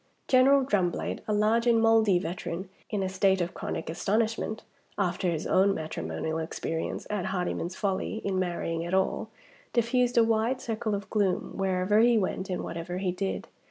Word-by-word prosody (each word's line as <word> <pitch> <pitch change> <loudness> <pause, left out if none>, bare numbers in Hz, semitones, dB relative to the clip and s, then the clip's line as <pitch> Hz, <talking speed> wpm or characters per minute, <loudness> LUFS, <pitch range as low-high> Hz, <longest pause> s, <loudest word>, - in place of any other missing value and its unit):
General 265 +1 +5
Drumblade, 185 -8 0
a - - -1
large 215 +3 +2
and 230 -1 +5
mouldy 225 -4 +4
veteran, 175 0 -4 0.2
in 205 -3 -1
a - - 0
state 190 0 +2
of 175 0 -2
chronic - - -4
astonishment 220 +5 -1 0.3
(after 180 -1 0
his 165 -2 -2
own 195 +1 +3
matrimonial 155 - -3
experience) 160 0 -3
at 205 -3 -1
Hardyman's 180 -1 -2
folly 195 0 -1
in 190 -2 0
marrying 170 -2 -2
at 175 +2 -1
all, 190 - 0 0.4
diffused 245 +1 +2
a 230 - +7
wide 225 +3 +1
circle 220 -3 -2
of 200 -1 -5
gloom, 200 -4 0
wherever 190 +2 +2
he 235 0 +5
went 190 -1 -1
and 180 - -2
whatever 170 +2 -5
he 185 -1 0
did. 190 +2 -3
195 Hz, 165 wpm, -28 LUFS, 180-220 Hz, 0.4 s, a